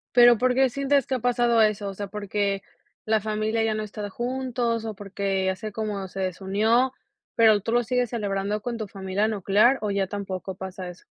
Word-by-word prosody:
Pero, 240 -1 +8
¿por 255 +1 +2
qué 265 0 +3
sientes 275 +1 +1
que 265 - 0
ha 255 - -2
pasado 240 -1 +2
eso? 210 -1 0
O 195 - -7
sea, 205 - -4
¿porque 200 -1 -2 0.4
la 220 0 +2
familia 215 +1 -1
ya 220 -1 +1
no 215 - -2
está 210 0 -5
juntos 240 -1 -2
o 220 - -3
porque 195 -1 -2
hace 200 +3 -4
como 205 -3 -3
se 190 +1 -8
desunió, 205 +7 +1 0.4
pero, 220 -3 +5
tú 225 - -3
lo 240 0 +3
sigues 250 0 0
celebrando 205 -2 -2
con 235 +1 -4
tu 215 -2 -4
familia 195 +2 -1
nuclear 215 +5 +3
o 210 - -1
ya 200 -1 +1
tampoco 190 -1 -5
pasa 190 0 -7
eso? 180 - -13
215 Hz, 200 wpm, -25 LUFS, 195-235 Hz, 0.4 s, Pero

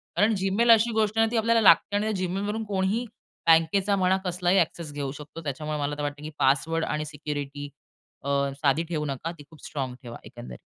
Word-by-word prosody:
कारण 215 +2 +3
Gmail 200 +5 +3
अशी 225 +1 +3
गोष्ट 220 -1 0
आहे 225 - +5
ना, 225 - -4
ती 240 - 0
आपल्याला 230 +1 +3
लागते 195 +1 +5
आणि 210 +1 +1
त्या 185 -2 -2
Gmailवरून 205 +4 -3
कोणीही 200 +4 0 0.4
बँकेचा 165 +5 +4
म्हणा, 190 0 +2
कसलाही 180 +1 +1
ॲक्सेस 165 -2 -2
घेऊ 140 -2 -3
शकतो. 150 +3 -10
त्याच्यामुळे 150 +1 -4
मला 145 0 -2
तर - - -4
वाटतं 145 0 -4
की 155 - -5
पासवर्ड 160 +5 +2
आणि 150 0 -2
सिक्युरिटी 145 -1 -6 0.5
अ, 140 - -4 0.3
साधी 145 +3 +2
ठेवू 155 -3 -2
नका. 140 +3 -4
ती 160 -4 -13
खूप 160 -3 -15
स्ट्राँग 135 -4 -4
ठेवा 120 -3 -9
एकंदरीत. 120 +2 -10
165 Hz, 200 wpm, -26 LUFS, 145-200 Hz, 0.5 s, आहे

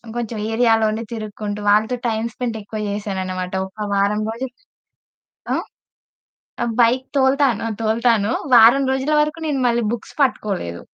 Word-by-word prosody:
కొంచెం 235 -2 -3 0.2
ఏరియాలోనే 225 -1 +2
తిరుక్కుంటూ 210 -2 -5
వాళ్ళతో 215 +4 +3
టైమ్ 220 0 -1
స్పెండ్ 240 -3 -3
ఎక్కువ 210 +1 -7
జేశానన్నమాట. 190 -3 -4
ఒక 210 +2 -6
వారం 200 +2 +1
రోజులు. 245 +3 -5 1.0
ఆ? - - +1 1.2
బైక్ 245 +2 +3
తోలుతాను, 265 -4 +2 0.2
తోలుతాను. 225 -1 +2 0.2
వారం 240 +4 +7
రోజుల 265 +3 -1
వరకు 300 +2 0
నేను 285 -3 -1
మళ్ళీ 235 0 +1
బుక్స్ 235 - -6
పట్టుకోలేదు. 195 - -1
225 Hz, 120 wpm, -20 LUFS, 210-245 Hz, 1.2 s, వారం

